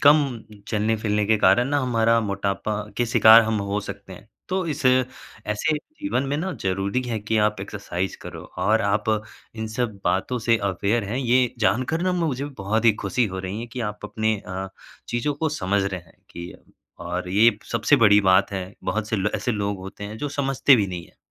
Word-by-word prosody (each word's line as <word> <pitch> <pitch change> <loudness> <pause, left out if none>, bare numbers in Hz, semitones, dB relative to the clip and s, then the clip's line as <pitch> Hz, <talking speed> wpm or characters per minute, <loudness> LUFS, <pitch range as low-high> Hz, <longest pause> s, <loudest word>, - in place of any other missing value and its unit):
कम 145 +2 +7 0.5
चलने-फिलने 105 -1 0
के 110 +1 +4
कारण 105 +6 +4
ना 145 0 +1
हमारा 115 -2 +2
मोटापा 100 0 -2 0.2
के 120 - +1
शिकार 110 0 +8
हम 110 -1 -1
हो 105 +1 0
सकते 100 -1 -8
हैं। 100 +4 -13 0.2
तो 190 0 -1
इस 145 - -7
ऐसे 125 0 0
जीवन 300 - -3
में 145 - 0
ना 185 +5 -2
ज़रूरी 95 +5 0
है 120 -3 -3
कि 110 +2 -1
आप 105 -2 -3
एक्सरसाइज़ 95 -2 -4
करो। - - -8 0.2
और 110 +2 +2
आप 100 +1 +1 0.5
इन 110 -1 -4
सब 110 -2 -3
बातों 95 +8 0
से 115 0 +2
अवेयर 100 +4 0
हैं, 105 +5 -3
ये 125 -1 +2
जानकर 130 +9 +1
ना 185 0 +1
म - - -1
मुझे 135 -2 -2 0.2
बहुत 110 +4 0
ही 115 - +7
खुशी 105 +5 +1
हो 95 - -4
रही 95 +2 -4
हैं, 120 - -7
कि 125 +2 -6
आप 105 0 -8
अपने 110 +1 0
अ, 95 +1 -5 0.4
चीज़ों 120 +5 -1
को 160 +3 -1
समझ 100 -9 0
रहे 95 -2 -3
हैं 80 -1 -23
कि 85 +1 -8 0.5
और 90 +1 -3
ये 105 +3 +4
सबसे 115 +5 +3
बड़ी 105 -1 +7
बात 95 +1 +4
है, 95 -1 -2 0.2
बहुत 105 +3 -2
से 110 - 0
ल 100 +1 0
ऐसे 125 - -1
लोग 100 -1 -2
होते 95 +2 -8
हैं, 105 +1 -7
जो 145 - -3
समझते 135 -1 +3
भी 105 -3 +1
नहीं 90 -2 -6
है, - - -26
110 Hz, 205 wpm, -23 LUFS, 100-125 Hz, 0.5 s, शिकार